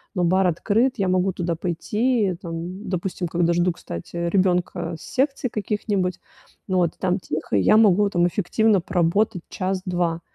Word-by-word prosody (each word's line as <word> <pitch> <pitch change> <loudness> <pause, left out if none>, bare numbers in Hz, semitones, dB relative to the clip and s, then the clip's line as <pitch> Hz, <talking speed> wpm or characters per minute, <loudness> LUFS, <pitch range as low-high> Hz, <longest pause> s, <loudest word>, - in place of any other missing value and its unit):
но 180 - +1
бар 185 +2 +3
открыт, 225 +9 +1
я 195 -3 0
могу 185 +1 +1
туда 170 -1 -2
пойти, 205 +5 0
там, 175 +3 -6
допустим, 180 0 -2
когда 170 0 +1
жду, 175 +1 +2
кстати, 85 - -8
ребёнка 175 -1 0
с - - -12
секций 270 -1 -1
каких-нибудь, 200 -3 -2 0.5
ну 185 - +1
вот, 175 -3 +2
там 185 +1 0
тихо, 155 - -4
я 95 - +4
могу 205 -2 +5
там 175 -3 +2
эффективно 205 +4 +2
поработать 180 +3 +1
час-два. 180 -3 -2
185 Hz, 150 wpm, -23 LUFS, 175-200 Hz, 0.5 s, могу